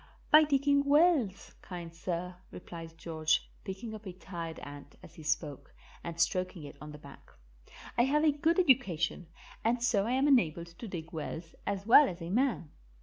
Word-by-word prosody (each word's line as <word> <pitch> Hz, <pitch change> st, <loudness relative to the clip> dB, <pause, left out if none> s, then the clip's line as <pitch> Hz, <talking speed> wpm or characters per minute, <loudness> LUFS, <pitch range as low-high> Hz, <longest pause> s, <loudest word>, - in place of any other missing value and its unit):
"By 305 Hz, +1 st, +8 dB
digging 280 Hz, -1 st, +3 dB
wells, 285 Hz, -, +3 dB
kind 170 Hz, -2 st, -8 dB
sir," 175 Hz, +1 st, -4 dB
replied 165 Hz, -2 st, -10 dB
George, 160 Hz, -1 st, 0 dB, 0.2 s
picking 210 Hz, +3 st, -6 dB
up 215 Hz, -1 st, -9 dB
a 185 Hz, -, -6 dB
tired 170 Hz, -3 st, -7 dB
ant 145 Hz, 0 st, -10 dB
as 160 Hz, -, -13 dB
he 165 Hz, -, -12 dB
spoke 150 Hz, -2 st, -3 dB, 0.3 s
and 170 Hz, 0 st, -6 dB
stroking 180 Hz, -1 st, 0 dB
it 145 Hz, -, -9 dB
on 150 Hz, 0 st, -8 dB
the 150 Hz, -, -9 dB
back. 140 Hz, -, -15 dB, 0.7 s
"I 240 Hz, -, +6 dB
have 300 Hz, +3 st, +2 dB
a 310 Hz, -, +5 dB
good 315 Hz, +4 st, +1 dB
education, 195 Hz, -, +2 dB, 0.4 s
and 235 Hz, +1 st, +1 dB
so 220 Hz, -4 st, +2 dB
I 245 Hz, -, 0 dB
am 265 Hz, +2 st, +2 dB
enabled 170 Hz, -, +2 dB
to 230 Hz, -, -6 dB
dig 170 Hz, -2 st, -7 dB
wells 160 Hz, +1 st, -6 dB
as 200 Hz, -1 st, -2 dB
well 265 Hz, +6 st, +7 dB
as 175 Hz, -, -7 dB
a 170 Hz, 0 st, -6 dB
man. 235 Hz, -, 0 dB
185 Hz, 180 wpm, -31 LUFS, 165-250 Hz, 0.7 s, By